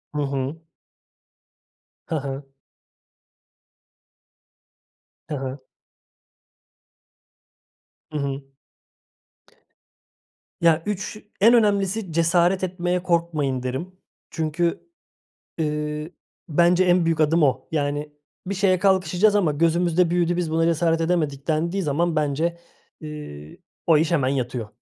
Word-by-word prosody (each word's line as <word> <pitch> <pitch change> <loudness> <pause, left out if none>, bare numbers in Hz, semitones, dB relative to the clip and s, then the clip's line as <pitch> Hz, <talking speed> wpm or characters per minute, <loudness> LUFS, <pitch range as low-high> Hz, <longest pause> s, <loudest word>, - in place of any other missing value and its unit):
Hı 150 - 0
hı. 140 +3 -3 1.4
Hı - - -3
hı. 140 -1 -4 2.9
Hı 150 - -2
hı. 135 +1 -5 2.5
Hı 155 - -3
hı. 140 -1 -2 2.2
Ya, 165 -1 +4
3 210 +1 -3 0.2
en 230 +4 +7
önemlisi 205 -3 +2
cesaret 170 +3 +2
etmeye 180 -1 -1
korkmayın 160 -7 0
derim. 130 +8 -4 0.4
Çünkü, 165 - -1 0.7
eee, 150 +1 -2 0.4
bence 175 +3 +4
en 180 -1 +3
büyük 165 -1 +1
adım 160 +2 +3
o. 135 -3 +1
Yani, 145 0 -1 0.3
bir 200 - -2
şeye 190 -1 +2
kalkışacağız 190 +2 +3
ama 175 -7 +2
gözümüzde 170 +2 +2
büyüdü, 175 0 +1
biz 175 -3 -1
buna 165 +1 +2
cesaret 165 0 +2
edemedik 155 -5 -1
dendiği 170 +5 0
zaman 160 +2 0
bence, 155 +3 0 0.4
iii, 150 - -9 0.3
o 160 -2 +6
iş 160 +1 +1
hemen 145 -7 +2
yatıyor. 125 -4 -2
165 Hz, 100 wpm, -23 LUFS, 150-175 Hz, 2.9 s, en